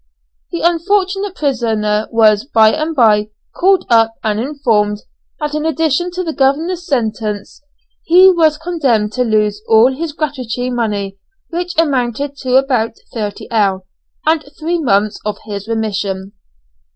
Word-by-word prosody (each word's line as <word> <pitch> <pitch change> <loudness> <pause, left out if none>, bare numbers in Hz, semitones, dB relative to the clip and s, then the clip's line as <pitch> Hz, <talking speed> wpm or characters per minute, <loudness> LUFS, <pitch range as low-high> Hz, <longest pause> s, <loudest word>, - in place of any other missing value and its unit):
The 340 - -3
unfortunate 380 +3 0
prisoner 220 -7 0
was 215 -2 +4
by 220 -6 +4
and 315 +1 -2
bye 215 -4 +3 0.3
called 380 0 +3
up 225 -1 +3
and 215 -1 0
informed 225 -6 0 0.4
that 300 -1 -3
in 305 0 -2
addition 320 +2 0
to 365 +1 -3
the 325 -2 -3
governor's 325 +7 0
sentence 220 - -3 0.4
he 370 +3 +6
was 320 -4 +2
condemned 275 -11 0
to 250 - 0
lose 210 -2 0
all 230 +4 +5
his 320 +1 -4
gratuity 255 -5 -3
money, 205 -5 -2 0.3
which 350 +1 -3
amounted 280 -2 0
to 255 -2 -1
about 255 -4 +2 0.2
3_l._, 205 -2 -1 0.4
and 315 0 +2 0.2
three 335 +2 -1
months 210 -7 +1
of 210 0 -3
his 205 -1 -6
remission. 200 -4 -3
250 Hz, 135 wpm, -16 LUFS, 215-320 Hz, 0.4 s, he